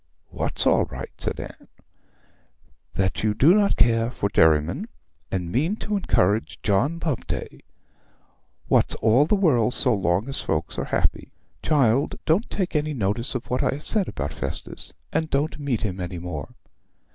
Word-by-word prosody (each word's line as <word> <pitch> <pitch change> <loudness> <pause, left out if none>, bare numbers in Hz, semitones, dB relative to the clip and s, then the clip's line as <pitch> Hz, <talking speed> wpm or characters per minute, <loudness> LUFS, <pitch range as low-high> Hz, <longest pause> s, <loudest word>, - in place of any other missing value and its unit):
'What's - - -2
all - - +4
right?' - - -7
said - - -2
Anne. - - -9 1.3
'That 95 -1 0
you 105 -1 +1
do 145 +10 +6
not 205 -1 +3
care 115 -1 +3
for 100 -5 -2
Derriman, 80 -5 +3 0.4
and 90 -3 -3
mean 155 - +1
to 210 -1 -3
encourage 110 - +1
John 125 +12 +1
Loveday. 150 -7 -3 1.1
What's - - +3
all 115 +7 +3
the 210 - +3
world 125 - +2
so 125 - +3
long 95 +2 +1
as 135 - -2
folks 80 0 -2
are - - -2
happy! - - -1 0.3
Child, 135 -3 +2
don't 175 +9 +2
take 185 -4 -2
any 150 0 0
notice 115 +3 -1
of 125 - -3
what 125 - +1
I - - +1
have 145 - -10
said 210 -4 +1
about 70 +1 -4
Festus, - - -4 0.2
and 160 -1 0
don't 145 +3 -1
meet 140 -7 -1
him 95 -3 -3
any 90 0 -4
more.' 85 -5 -6
120 Hz, 160 wpm, -24 LUFS, 95-155 Hz, 1.3 s, do